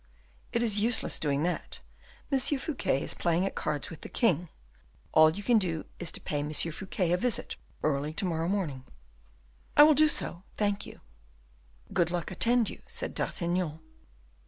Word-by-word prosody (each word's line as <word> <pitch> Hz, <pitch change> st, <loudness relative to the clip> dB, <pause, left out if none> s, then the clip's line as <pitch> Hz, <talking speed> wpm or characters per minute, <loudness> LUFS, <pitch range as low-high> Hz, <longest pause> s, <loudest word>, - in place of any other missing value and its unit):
"It 235 Hz, -1 st, +1 dB
is 215 Hz, -3 st, +3 dB
useless 230 Hz, +2 st, +1 dB
doing 145 Hz, -1 st, 0 dB
that; 175 Hz, 0 st, -2 dB, 0.5 s
M. 270 Hz, -, +3 dB
Fouquet 260 Hz, -, +1 dB
is -, -, 0 dB
playing 170 Hz, +2 st, +1 dB
at 195 Hz, -, -2 dB
cards 150 Hz, -2 st, -2 dB
with 165 Hz, -, -9 dB
the -, -, -8 dB
king. 180 Hz, -, +1 dB, 0.6 s
All 155 Hz, 0 st, +7 dB
you 200 Hz, +6 st, -5 dB
can 235 Hz, +1 st, +4 dB
do 165 Hz, -5 st, -2 dB
is 175 Hz, -2 st, -2 dB
to -, -, -3 dB
pay 145 Hz, -, -3 dB
M. 150 Hz, +1 st, -3 dB
Fouquet 170 Hz, +3 st, -1 dB
a 175 Hz, -, +3 dB
visit 245 Hz, +3 st, 0 dB, 0.3 s
early 145 Hz, 0 st, 0 dB
to 195 Hz, -, 0 dB
morrow 165 Hz, -2 st, -1 dB
morning." 170 Hz, -10 st, -2 dB, 0.9 s
"I 295 Hz, -, +11 dB
will 305 Hz, +1 st, +7 dB
do 310 Hz, +2 st, +5 dB
so. 175 Hz, -, 0 dB
Thank 205 Hz, -1 st, -1 dB
you." -, -, -12 dB, 0.9 s
"Good 170 Hz, -1 st, +2 dB
luck 175 Hz, -2 st, -3 dB
attend 235 Hz, -1 st, +3 dB
you," -, -, -6 dB
said -, -, -4 dB
D'Artagnan. 170 Hz, -2 st, -2 dB
180 Hz, 170 wpm, -29 LUFS, 160-220 Hz, 0.9 s, I